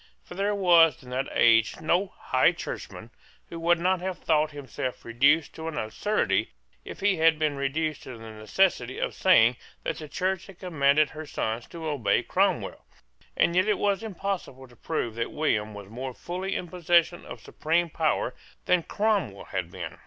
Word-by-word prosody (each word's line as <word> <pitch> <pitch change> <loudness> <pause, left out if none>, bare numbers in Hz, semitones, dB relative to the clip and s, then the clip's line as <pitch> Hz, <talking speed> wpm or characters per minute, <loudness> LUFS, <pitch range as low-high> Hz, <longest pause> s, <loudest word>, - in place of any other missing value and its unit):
For - - -11
there 200 +2 0
was 170 -7 +5
in 125 - -12
that 130 +2 -2
age 115 -1 +4
no 175 +5 +1
High - - +3
Churchman - - -7 0.4
who 165 - -7
would 170 +1 +3
not 180 +1 +1
have 185 -1 -3
thought 155 -1 +1
himself 140 -3 -6
reduced 140 +7 +3
to 160 0 -7
an 160 -2 -4
absurdity 180 - 0 0.3
if - - -9
he 200 -2 +2
had 160 0 +4
been 155 -2 0
reduced 145 +2 -2
to 125 -3 -9
the 115 0 -10
necessity 125 - 0
of - - -2
saying 125 -10 +5 0.3
that - - -3
the 155 -2 -8
Church 185 +2 -2
had 195 -3 -13
commanded 150 -5 +2
her 155 0 -8
sons 115 -2 -3
to 165 -1 -8
obey 130 -10 +1
Cromwell. - - 0 0.5
And 170 - +3
yet 185 +3 +3
it 210 - +2
was 200 -2 +1
impossible 195 - -5
to 120 - -18
prove 120 -3 -3
that 115 +1 -3
William 110 -9 -1
was 100 -1 -9
more 125 +4 -6
fully 185 +2 -4
in 180 - -3
possession 175 0 +2
of - - -9
supreme 165 +1 -1
power 155 -6 0 0.3
than 180 -1 +3
Cromwell 200 - -1
had 90 -2 -2
been. - - -8
155 Hz, 180 wpm, -27 LUFS, 130-180 Hz, 0.5 s, was